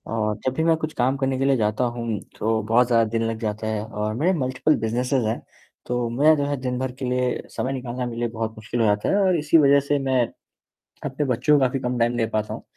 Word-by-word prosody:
और 105 -1 0
जब 130 - +1
भी 160 - -1
मैं 165 0 +4
कुछ 155 0 -4
काम 130 +2 +1
करने 135 -1 0
के 135 - +1
लिए 135 -2 +3
जाता 105 +2 0
हूँ, 120 -3 -2 0.2
तो 110 +1 +1
बहुत 115 +3 +3
ज़्यादा 115 -2 +4
दिन 115 0 -1
लग 115 -1 -4
जाता 110 0 -3
है 110 -1 -2
और 105 -1 -3
मेरे 165 +10 +2
मल्टिप्ल 130 +4 +1
बिज़नेसेज़ 125 +3 0
हैं, 110 - -2 0.4
तो 120 -1 -1
मुझे 145 +7 +4
जो 145 -1 -1
है 145 0 -1
दिन-भर 130 0 -2
के 135 - -3
लिए 125 0 0
समय 130 - -1
निकालना 125 -1 -4
मेरे 115 -1 -5
लिए 120 - 0
बहुत 115 -1 -3
मुश्किल 110 +2 -4
हो 115 - +3
जाता 105 -1 +1
है - - +2
और 185 -3 +3
इसी 150 +2 +4
वजह 140 -2 +6
से 140 +1 0
मैं 130 -2 +2 0.8
अपने 145 +1 -2
बच्चों 130 +3 +3
का 130 - +4
भी 135 - -2
कम 125 -1 -2
टाइम 120 +1 +1
दे 115 - +2
पाता 110 -1 -2
हूँ, - - -8
125 Hz, 250 wpm, -23 LUFS, 115-135 Hz, 0.8 s, वजह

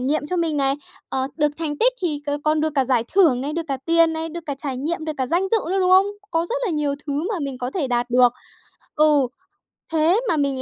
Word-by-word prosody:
nghiệm 290 +4 0
cho 360 - -2
mình 330 -3 0
này, 275 -1 +2 0.3
ờ, 265 0 -1
được 300 -1 +2
thành 300 -3 -3
tích - - +4
thì 305 -5 -1
c 290 0 -2
còn 305 0 +2
được 315 0 0
cả 270 - +2
giải 245 -3 +1
thưởng 320 -11 +5
này, 285 +3 -3
được 330 0 -3
cả 275 - -1
tiền 330 0 +4
này, 320 0 -3
được 340 +1 -7
cả 285 - -2
trải 275 -3 -4
nghiệm, 315 +5 -3
được 310 - -2
cả 260 - -1
danh 350 +8 0
dự 455 - +4
nữa, 385 - +1
đúng 365 0 +2
không? 380 +2 +6 0.2
Có 330 +1 0
rất - - -2
là - - -1
nhiều 300 -3 0
thứ 290 +4 -2
mà 440 - -1
mình 275 -3 -4
có 250 0 -3
thể 300 -2 -2
đạt 245 0 -1
được 245 0 +5 0.6
ừ, 300 -3 +4 0.7
thế 325 +6 +3
mà 325 - +2
mình 280 -2 0
300 Hz, 260 wpm, -22 LUFS, 275-335 Hz, 0.7 s, không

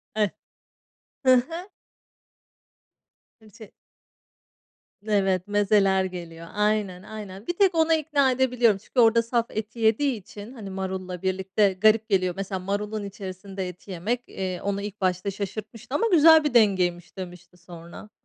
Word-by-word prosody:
Eh. 210 -1 +2 1.0
Hı 260 - +7
hı. 330 +10 -2 1.7
Kimchi. 215 -1 -15 1.4
Evet, 195 -3 +1
mezeler 200 -2 +3
geliyor. 170 -2 -8
Aynen, 210 -3 0
aynen, 210 -1 -9
bir - - 0
tek 385 -3 +3
ona 325 0 +3
ikna 290 -4 +2
edebiliyorum. 245 -5 +2
Çünkü, 235 +5 -4
orada 230 0 +6
saf 235 0 0
eti 220 +2 -6
yediği 230 +5 +2
için, 205 +5 -11
hani, 215 -6 -8
marulla 190 -1 -5
birlikte 190 +1 +1
garip 215 +3 +3
geliyor. 185 -3 +2
Mesela, 195 -1 -3
marulun 205 +3 -3
içerisinde 195 -1 -6
eti 180 +2 -10
yemek, 215 +8 -2
eee, 185 -2 -4
onu 200 0 -2
ilk 205 0 -7
başta 185 +1 0
şaşırtmıştı, 215 +5 -6
ama 460 - +2
"Güzel 320 -1 +7
bir 295 - -1
dengeymiş." 185 -7 +2
demişti 180 -1 -9
sonra. 175 +3 -12
205 Hz, 135 wpm, -25 LUFS, 185-230 Hz, 1.7 s, Hı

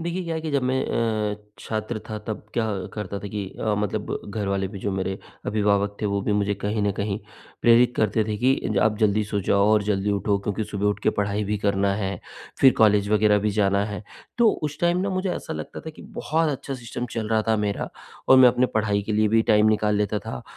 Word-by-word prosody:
देखिए 170 +2 -3
क्या 165 -1 -3
है 160 - -2
कि 160 - -4
जब 140 -2 +1
मैं 130 +1 0 0.5
अ, - - -14 0.2
छात्र 110 +1 -4
था 110 -1 -4
तब 110 -2 -5
क्या 115 -2 +1 0.3
करता 105 -2 -4
था 100 - -7
कि 105 0 -4 0.2
अ, 110 -1 +1
मतलब 105 -2 -2
घरवाले 100 -2 -1
भी 100 -1 -8
जो 100 - -2
मेरे 95 0 -2 0.3
अभिभावक 100 -1 +1
थे 105 - 0
वो 100 0 0
भी 105 - 0
मुझे 105 0 +1
कहीं 105 +2 -2
न 100 -1 +1
कहीं 100 +1 -2 0.4
प्रेरित 120 +1 +5
करते 110 0 +2
थे 105 -1 -2
कि 130 +4 +3 0.2
ज - - +2
आप 105 -1 +2
जल्दी 105 0 +2
सो 100 0 -2
जाओ 100 +2 +2
और 105 -1 +4
जल्दी 100 0 0
उठो 100 0 +1
क्योंकि 105 +2 -3
सुबह 105 -1 -2
उठकर 105 0 +1
पढ़ाई 105 +1 -1
भी 105 +1 -1
करना 100 -1 +1
है, 100 -2 -3 0.4
फ़िर 135 -1 +7
कॉलेज 105 -2 +4
वग़ैरह 105 -1 +4
भी 105 +1 0
जाना 100 -1 +2
है। 105 0 -5 0.4
तो 235 -2 +6
उस 150 0 -3
टाइम 175 +1 +2
ना 195 +1 -1
मुझे 185 0 -1
ऐसा 160 - -6
लगता - - -6
था 160 - -7
कि - - -14
बहुत 160 +1 -1
अच्छा 135 0 -4
सिस्टम 120 0 -5
चल 110 -2 -3
रहा 110 -1 +2
था 110 - +3
मेरा 105 -1 -2 0.4
और 130 - +8
मैं 130 -1 +9
अपनी 125 +1 +2
पढ़ाई 105 -2 +1
के 105 - -3
लिए 105 0 +3
भी 110 +1 +3
टाइम 105 0 +5
निकाल 105 -1 +2
लेता 105 0 0
था। 65 -8 -7
105 Hz, 235 wpm, -24 LUFS, 100-115 Hz, 0.5 s, मैं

